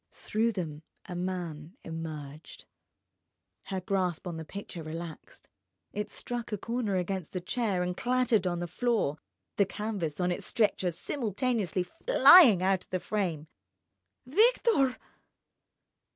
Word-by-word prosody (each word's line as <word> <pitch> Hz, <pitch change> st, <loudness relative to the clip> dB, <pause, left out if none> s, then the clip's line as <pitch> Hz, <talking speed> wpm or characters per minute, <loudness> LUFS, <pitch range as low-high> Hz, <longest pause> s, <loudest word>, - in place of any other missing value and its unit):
Through 225 Hz, +2 st, -1 dB
them 160 Hz, -6 st, -4 dB, 0.2 s
a 180 Hz, -, -7 dB
man 175 Hz, -, -4 dB
emerged. 155 Hz, -2 st, -7 dB, 1.0 s
Her 190 Hz, -2 st, -3 dB
grasp 185 Hz, -2 st, -1 dB
on 175 Hz, -2 st, -4 dB
the 160 Hz, -, -5 dB
picture 190 Hz, 0 st, -7 dB
relaxed. 160 Hz, +1 st, -8 dB, 0.5 s
It 210 Hz, 0 st, -3 dB
struck 240 Hz, -1 st, -5 dB
a 210 Hz, -, -1 dB
corner 230 Hz, -1 st, -2 dB
against 185 Hz, -2 st, -2 dB
the 185 Hz, -, -1 dB
chair 195 Hz, -1 st, -1 dB
and 180 Hz, 0 st, -2 dB
clattered 245 Hz, -5 st, +2 dB
on 175 Hz, -1 st, -1 dB
the 175 Hz, 0 st, -3 dB
floor—the 200 Hz, -, -1 dB
canvas 195 Hz, -8 st, -3 dB
on 180 Hz, 0 st, +1 dB
its 175 Hz, -, -4 dB
stretcher 205 Hz, -5 st, +1 dB
simultaneously 210 Hz, -, -1 dB
flying 245 Hz, -, +7 dB
out 190 Hz, -1 st, +1 dB
of -, -, -38 dB
the 185 Hz, -, -1 dB
frame. 175 Hz, -7 st, -2 dB, 0.8 s
"Victor!" 395 Hz, -, +3 dB
185 Hz, 125 wpm, -29 LUFS, 170-225 Hz, 1.0 s, flying